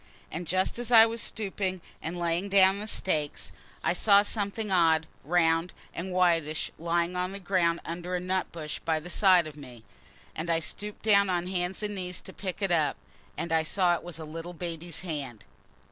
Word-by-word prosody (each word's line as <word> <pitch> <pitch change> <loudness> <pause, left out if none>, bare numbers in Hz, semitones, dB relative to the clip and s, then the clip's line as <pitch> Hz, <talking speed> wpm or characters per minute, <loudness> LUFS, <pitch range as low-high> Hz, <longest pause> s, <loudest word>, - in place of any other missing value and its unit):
And 175 +1 -5
just 185 +6 0
as 240 0 -3
I 225 -1 +9
was 230 0 -2
stooping 195 -3 -2 0.2
and 170 +3 -4
laying 170 +3 0
down 195 0 +5
the 210 - -5
stakes, 155 -8 -2 0.3
I - - +2
saw 200 +2 +5
something 210 0 -2
odd 165 -3 +4 0.2
and 150 - -15
round 165 0 +3 0.2
and 185 +2 -5
whitish 165 -4 +1
lying 170 +1 0
on 180 +1 -2
the 200 - -6
ground 175 -3 +1
under 175 +2 -4
a - - 0
nut 185 +1 -1
bush 155 -2 -6
by 160 -1 0
the 175 +3 -9
side 185 -4 +5
of 155 -1 -8
me. 125 -6 -12 0.5
And 165 +2 -4
I 165 - +3
stooped 205 +5 -6
down 200 -2 +5
on 175 -1 0
hands 180 +2 -2
and 210 0 -2
knees 180 -2 -4
to 190 - -11
pick 195 0 -5
it 195 - +1
up. 160 -4 +2 0.4
And 170 - -3
I 160 -1 +4
saw 175 +2 +2
it 170 - -2
was 175 -1 -6
a 160 - -6
little 165 +3 -7
baby's 170 -1 -5
hand." 140 - -5
175 Hz, 200 wpm, -28 LUFS, 165-190 Hz, 0.5 s, I